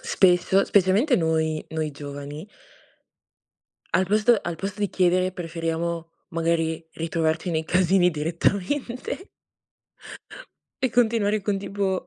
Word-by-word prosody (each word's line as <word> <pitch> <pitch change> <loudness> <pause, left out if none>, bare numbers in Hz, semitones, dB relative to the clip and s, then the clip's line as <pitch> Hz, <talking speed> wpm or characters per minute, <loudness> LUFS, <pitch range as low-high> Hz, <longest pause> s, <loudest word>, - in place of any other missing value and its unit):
spesso, 185 +1 +3
specialmente 205 - +3
noi 160 -1 0
noi 155 -1 -2
giovani 145 +4 -8 1.4
al 190 - +3
posto 215 +4 +4
al 170 - -4
posto 195 +4 -5
di 205 - +1
chiedere 185 0 +2
preferiamo, 165 -1 -3 0.2
magari, 165 -1 0
ritrovarci 165 +1 -1
nei 160 -1 -1
casini 180 +1 +3
direttamente. 200 - -2 1.5
E 260 - +2
continuare 220 -3 +2
con, 200 0 -1
tipo, 195 -1 -2
180 Hz, 105 wpm, -24 LUFS, 165-200 Hz, 1.5 s, posto